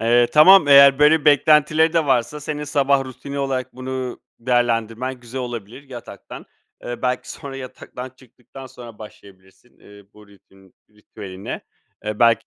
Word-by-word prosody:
Eee, 120 +1 +3
tamam, 155 +1 +7
eğer 140 -1 +7
böyle 150 +1 +4
beklentileri 150 +2 +3
de 165 -3 +1
varsa 135 +3 0
senin 150 0 -5
sabah 140 -2 +1
rutini 140 +2 -8
olarak 135 -2 -3
bunu 130 -1 -6 0.2
değerlendirmen 120 +1 -1
güzel 125 +2 -7
olabilir. 120 0 -8
Yataktan 120 -3 -11 0.4
eee, 120 0 -7
belki 125 0 -2
sonra 135 -1 -9
yataktan 130 0 -9
çıktıktan 130 +1 -15
sonra 120 -3 -13
başlayabilirsin, 100 +1 -17
eee, 100 -1 -17
bu 105 -1 -18
ritün 95 -1 -23 0.2
ritüeline. 100 -2 -9 0.4
Eee, 105 0 -5
belki 115 -1 +3
125 Hz, 140 wpm, -20 LUFS, 115-140 Hz, 0.4 s, tamam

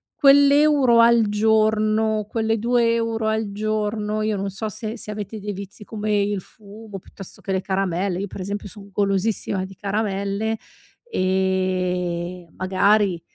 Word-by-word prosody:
quell'euro 280 -3 +5
al 230 -1 +5
giorno, 215 0 +2
quelle 225 0 0
2€ 230 -1 +1
al 220 -1 -1
giorno, 215 0 -2
io 215 -1 0
non 195 +1 -2
so 215 +3 -3
se 220 +3 -4
se 210 - -6
avete 210 +1 -6
dei 205 0 -4
vizi 200 +2 -9
come 210 -1 -1
il 200 -1 -1
fumo 210 +1 -11
piuttosto 195 +1 -9
che 195 - -5
le 190 0 0
caramelle- 190 -1 -1
io 200 - -3
per 190 - -8
esempio 200 +2 -4
son 200 +1 -9
golosissima 195 -1 0
di 190 0 -12
caramelle- 200 +2 -2 0.5
ehm, 180 - -1
magari 190 -1 +2
210 Hz, 140 wpm, -22 LUFS, 190-220 Hz, 0.5 s, quell'euro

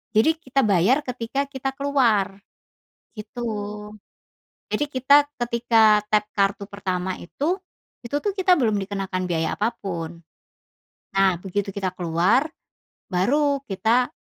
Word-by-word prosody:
Jadi 220 +9 +5
kita 265 +1 0
bayar 200 +7 +4
ketika 250 +3 -2
kita 270 -1 -4
keluar, 240 -9 +2 0.8
gitu. 215 +3 -8 1.3
Jadi 295 - +1
kita 285 +2 +5 0.2
ketika 230 -3 +4
tap 210 -1 +3
kartu 200 0 +1
pertama 185 -2 -2
itu, 320 - -2 0.5
itu 235 - -4
tuh 410 - +1
kita 375 -2 +4
belum 220 -4 +2
dikenakan 195 -2 -3
biaya 160 -1 0
apapun. 175 -7 -3 0.9
Nah, 195 -2 +4
begitu 195 +1 -3
kita 195 -2 -1
keluar 180 - +2 0.7
baru 280 +10 +2
kita, 225 +6 +2
215 Hz, 115 wpm, -23 LUFS, 190-265 Hz, 1.3 s, Jadi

